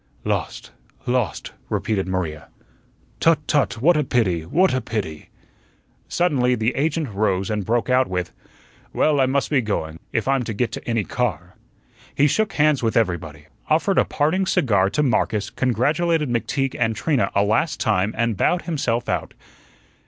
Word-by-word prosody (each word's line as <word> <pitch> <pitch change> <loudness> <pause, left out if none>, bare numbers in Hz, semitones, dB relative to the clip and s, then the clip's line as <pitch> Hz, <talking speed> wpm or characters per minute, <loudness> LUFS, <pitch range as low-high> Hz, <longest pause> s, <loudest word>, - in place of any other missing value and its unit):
"Lost, - - -3 0.3
lost," 120 -9 -1 0.2
repeated 100 -4 -1
Maria. 85 -5 -3 0.7
"Tut, 165 -1 +4
tut! 135 -6 +1
What 175 +3 +5
a 150 - +2
pity! 105 - +1
What 180 - +2
a 130 - 0
pity!" 95 -11 -5 0.8
Suddenly 135 -8 +1
the 115 +1 0
agent 155 0 0
rose 100 -1 0
and 105 -1 -1
broke 115 +3 0
out 130 0 +3
with: 90 -1 -3 0.6
"Well, 150 -2 +2
I 130 - +4
must 140 +3 0
be 140 -4 +3
going, 80 -7 -3
if 115 -3 -1
I'm 135 -1 +2
to 110 - -4
get 120 +3 -1
any 115 -3 0
car." 90 -7 -3 0.6
He 140 - +4
shook 215 +8 +1
hands 150 -2 +3
with 115 -1 0
everybody, 80 -8 -1 0.2
offered - - +2
a - - +5
parting 180 +6 0
cigar 105 - +2
to 150 +8 0
Marcus, 110 -5 0
congratulated 150 +5 +1
McTeague 135 +3 -1
and 115 -2 +1
Trina 120 +1 +1
a 100 - +4
last 110 +10 0
time, 105 -1 +1
and 115 -1 +1
bowed 175 - +1
himself 130 -8 -1
out. - - -3
120 Hz, 160 wpm, -22 LUFS, 100-145 Hz, 0.8 s, What